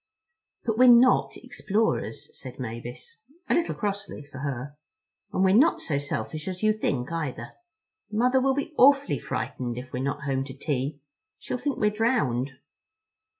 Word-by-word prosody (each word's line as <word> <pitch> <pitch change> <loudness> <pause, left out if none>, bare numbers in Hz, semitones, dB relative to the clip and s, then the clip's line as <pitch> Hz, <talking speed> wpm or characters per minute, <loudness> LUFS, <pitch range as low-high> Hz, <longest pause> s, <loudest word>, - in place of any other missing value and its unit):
"But 225 0 0
we're 255 - +8
not 245 +1 +6
explorers," 205 - -2
said 130 -2 -9
Mavis, 120 - -7 0.3
a - - +2
little 340 - +1
crossly, 200 -6 -4
for 140 -2 -11
her; 140 0 -4 0.6
"and 185 - +1
we're 190 0 +5
not 280 +11 +5
so 140 -3 -1
selfish 150 +2 -4
as 185 +1 -5
you 215 0 +5
think, 140 -10 -2
either. 145 -8 -4 0.6
Mother 250 +4 +3
will 265 0 +2
be 285 +2 -3
awfully 280 +2 +5
frightened 120 -2 -4
if 125 +1 -8
we're 125 - -2
not 140 +2 -2
home 135 -1 0
to 135 -1 -9
tea. 140 0 -2 0.4
She'll 250 - -4
think 280 +2 -2
we're 210 0 +2
drowned." 150 - +1
155 Hz, 155 wpm, -26 LUFS, -, 0.6 s, we're